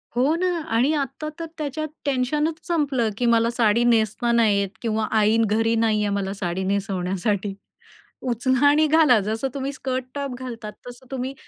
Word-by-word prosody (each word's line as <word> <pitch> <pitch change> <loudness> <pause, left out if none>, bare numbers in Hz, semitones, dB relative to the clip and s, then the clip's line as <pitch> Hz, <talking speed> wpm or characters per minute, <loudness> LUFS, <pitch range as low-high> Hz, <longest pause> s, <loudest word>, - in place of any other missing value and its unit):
हो 265 +5 +3
ना 365 +2 0 0.3
आणि 255 +6 +3
आता 295 +2 -3
तर 330 - -3
त्याच्यात 310 +1 -3 0.2
टेन्शनच 295 +4 0
संपलं 280 -9 +1
की 245 - 0
मला 230 0 +3
साडी 235 -1 +2
नेसता 235 0 +2
नाही 220 -4 +3
येत 200 -1 -1
किंवा 220 -2 -1
आई 215 0 +3
घरी 225 +2 +1
नाहीये 215 -2 +1
मला 195 -1 -2
साडी 185 -1 -3
नेसवण्यासाठी. 195 +1 -1 0.7
उचला 260 +2 +1
आणि 305 +2 +5
घाला. 300 -7 +5
जसं 220 +5 -1
तुम्ही 275 0 -3
स्कर्ट 260 -2 -3
टॉप 280 -3 -3
घालतात 230 -4 -7
तसं 245 +1 -11
तुम्ही 260 0 -3
235 Hz, 160 wpm, -23 LUFS, 215-270 Hz, 0.7 s, आणि